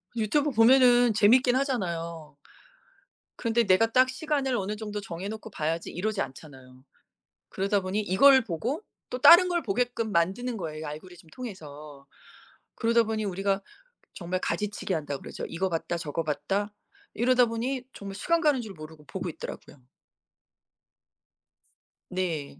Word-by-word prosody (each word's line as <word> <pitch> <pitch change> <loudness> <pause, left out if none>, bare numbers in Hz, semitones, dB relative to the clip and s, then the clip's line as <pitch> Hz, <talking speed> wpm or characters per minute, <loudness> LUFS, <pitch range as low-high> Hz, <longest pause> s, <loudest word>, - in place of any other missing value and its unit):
유튜브 280 +7 +1
보면은 245 0 +5
재밌긴 245 +4 +4
하잖아요. 170 - -3 1.0
근데 230 0 +1
'내가 220 +3 +3
딱 255 +2 +4
시간을 270 -1 -1
어느 200 +1 -3
정도 210 -1 -5
정해 180 0 -6
놓고 220 +1 -7
봐야지.' 165 -1 -3
이러지 200 +3 -2
않잖아요. 130 -3 -10 0.7
그러다 200 +1 0
보니 190 +3 -2
이걸 260 +7 +5
보고 230 - -3 0.3
또 250 - -3
다른 345 +7 +8
걸 345 -1 0
보게끔 230 -1 -1
만드는 200 +9 0
거예요 155 -5 -6
알고리즘 165 +3 -10
통해서. 150 - -10 0.7
그러다 230 0 +3
보니 220 -1 -2
우리가 195 +1 -1 0.5
정말 180 0 -3
가지치기한다고 175 -10 -3
그러죠. - - -7
'이거 190 +3 -2
봤다 170 0 -2
저거 165 -1 -3
봤다.' 155 +8 -2 0.4
이러다 245 +2 +3
보니 245 +3 -3
정말 195 -1 -8
시간 335 - +1
가는 295 -5 +2
줄 215 -3 -8
모르고 155 -1 -12
보고 185 -1 -5
있더라고요. 155 - -9 2.3
네. 165 -7 -3
205 Hz, 315 characters per minute, -27 LUFS, 170-245 Hz, 2.3 s, 다른